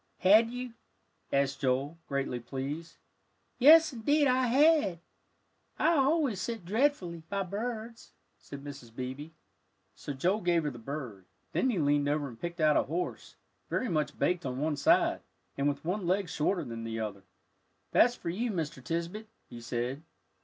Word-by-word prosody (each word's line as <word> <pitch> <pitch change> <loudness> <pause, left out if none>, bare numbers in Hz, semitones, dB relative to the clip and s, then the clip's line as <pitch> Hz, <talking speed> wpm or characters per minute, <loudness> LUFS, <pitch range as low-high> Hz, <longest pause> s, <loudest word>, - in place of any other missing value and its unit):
"Had 215 +4 +6
you?" 250 0 -6 0.6
asked 140 0 +1
Joel, 135 +4 0
greatly 135 -3 -2
pleased. 140 +7 -6 0.6
"Yes, 315 +3 +8
indeed 290 +6 +2
I 255 -1 +3
had. 280 - +4 0.8
I - - +3
always 275 - +2
set 225 -1 -4
dreadfully 200 - 0
by 200 -1 -1
birds," 225 +4 -5 0.3
said 140 -1 -10
Mrs. 135 -5 -10
Beebe. 130 +4 -5 0.6
So - - -7
Joel 185 +10 0
gave 175 -2 +2
her 150 - -1
the 120 - -10
bird, 115 -7 -6 0.3
then 260 - +1
he 230 - 0
leaned 145 -2 +2
over 145 -1 0
and 115 -3 -12
picked 170 0 -5
out 155 -2 +4
a - - +5
horse, 170 +5 -4 0.3
very 255 - -1
much 155 -4 -1
baked 180 -1 +1
on 130 -2 -3
one 155 +1 0
side, 140 - +3 0.3
and 140 +1 +1
with 145 - -5
one 185 +1 -2
leg 190 0 +1
shorter 170 +5 0
than 115 -1 -6
the 115 0 -4
other 105 -3 -4 0.7
"That's 240 +1 +5
for 170 - -4
you, 230 +7 -2
Mr. 160 - -3
Tisbett," 170 +9 -3 0.2
he 120 - -8
said. 120 +4 -3
170 Hz, 160 wpm, -30 LUFS, 140-220 Hz, 0.8 s, Yes